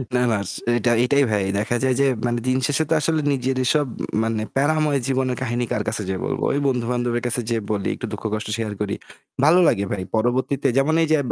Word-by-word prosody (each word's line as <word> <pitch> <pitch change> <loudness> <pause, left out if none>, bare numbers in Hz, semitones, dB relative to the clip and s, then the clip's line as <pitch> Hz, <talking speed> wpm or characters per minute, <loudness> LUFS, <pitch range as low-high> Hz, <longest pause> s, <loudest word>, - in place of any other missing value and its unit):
না, 125 - +3
না। 110 - +2
এস - - -6 0.2
এইটা 120 0 +2
এইটাই 140 +3 +3
ভাই। 105 -2 +1 0.2
দেখা 110 +3 -1
যায় 130 -1 +2
যে 140 - +4 0.2
মানে 120 0 0
দিনশেষে 130 +4 +1
তো - - +3
আসলে 160 0 +1
নিজেরই 130 -1 0
সব 145 -2 +2 0.4
মানে 110 -1 -1
প্যারাময় 145 0 +2
জীবনের 130 -1 0
কাহিনী 120 -1 -1
কার 105 - 0
কাছে 110 -1 -3
যে 95 - -1
বলবো? - - -2
ওই 140 - +1
বন্ধু-বান্ধবের 120 -1 -1
কাছে 125 +1 0
যেয়ে 115 -2 -1
বলি, 100 -2 -1
একটু - - -6
দুঃখ-কষ্ট 105 0 -3
share 110 -2 -3
করি। 100 -1 -1 0.5
ভালো 170 +4 +6
লাগে 100 - +2
ভাই। 95 -3 -2
পরবর্তীতে 130 +5 +1
যেমন 150 +4 +3
এইযে 155 0 +3
125 Hz, 200 wpm, -22 LUFS, 110-140 Hz, 0.5 s, ভালো